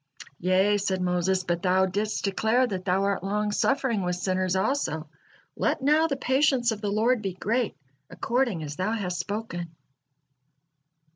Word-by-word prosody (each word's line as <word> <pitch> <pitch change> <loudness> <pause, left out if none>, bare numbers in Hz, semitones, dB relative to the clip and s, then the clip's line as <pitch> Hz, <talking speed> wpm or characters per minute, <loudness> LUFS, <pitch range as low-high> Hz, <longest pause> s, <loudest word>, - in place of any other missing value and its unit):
"Yea," 190 +3 +3
said 195 -1 -1
Moses, 180 +1 +1
"but 175 -1 -1
Thou 185 +1 +3
didst 205 +3 -2
declare 220 +6 +2
that 190 -6 -4
Thou 190 +1 +1
art 200 -2 0
long 210 +2 -1
suffering 265 -1 +1
with 180 -1 -1
sinners 185 0 -1
also, 190 - -1 0.5
let - - 0
now 305 +3 +4
the 280 - -1
patience 265 -2 +2
of 215 -2 -5
the 205 - -1
Lord 225 +3 +2
be 195 -3 -3
great 230 +4 -1 0.3
according 235 -9 -1
as 145 -1 -6
Thou 185 +4 0
has 180 -5 -3
spoken." 175 -6 -5
200 Hz, 155 wpm, -26 LUFS, 185-230 Hz, 0.5 s, now